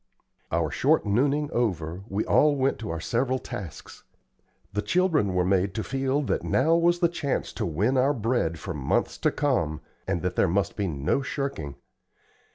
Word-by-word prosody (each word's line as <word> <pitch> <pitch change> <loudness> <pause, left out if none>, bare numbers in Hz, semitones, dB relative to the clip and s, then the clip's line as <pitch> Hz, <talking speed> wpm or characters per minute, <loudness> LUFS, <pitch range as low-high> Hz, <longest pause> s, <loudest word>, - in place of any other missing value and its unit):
Our 80 -3 0
short 150 - +2
nooning 140 +8 +1
over, 90 -7 -1
we 100 +1 -1
all 150 -1 +4
went 135 0 0
to 110 - -5
our 85 0 -3
several 125 +8 0
tasks. 95 -9 -8 0.7
The 105 - 0
children 160 - +1
were 90 -1 +2
made 95 0 +1
to 110 - -2
feel 135 +2 0
that - - -1
now 155 +6 +2
was 175 +1 +3
the 170 - +5
chance 160 -5 -2
to - - -2
win 105 - +1
our 140 +3 +3
bread 115 -8 0
for - - -5
months - - -1
to - - +3
come, 100 - 0 0.3
and 85 - -1
that 90 0 -1
there - - +3
must 95 +1 0
be 100 -3 -1
no 75 - 0
shirking. 135 - -4
115 Hz, 175 wpm, -26 LUFS, 90-140 Hz, 0.7 s, the